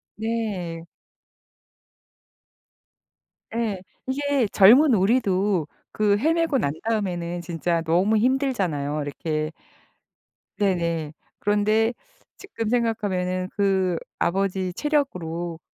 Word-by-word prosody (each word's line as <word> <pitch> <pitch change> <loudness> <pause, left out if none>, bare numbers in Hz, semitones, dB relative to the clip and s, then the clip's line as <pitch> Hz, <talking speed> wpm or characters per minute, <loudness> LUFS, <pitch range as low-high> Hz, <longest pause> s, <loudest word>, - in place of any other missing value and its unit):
네. 205 -7 -3 2.6
네. 220 -5 -2 0.3
이게 280 -1 +1
젊은 245 +8 +7
우리도 195 - +2 0.2
그 205 -1 +2
헤매고 320 +3 +2
난 140 - 0
다음에는 175 -6 -2
진짜 170 -1 -1
너무 180 +7 +2
힘들잖아요. 200 - 0
이렇게 155 +1 -3 1.0
네네. 170 -6 0 0.3
그런데 215 +3 +2 0.4
지금 225 - -5
생각하면은 195 -6 0
그 190 -4 +1 0.2
아버지 190 0 0
체력으로 175 - -2
195 Hz, 190 characters per minute, -24 LUFS, 170-230 Hz, 2.6 s, 젊은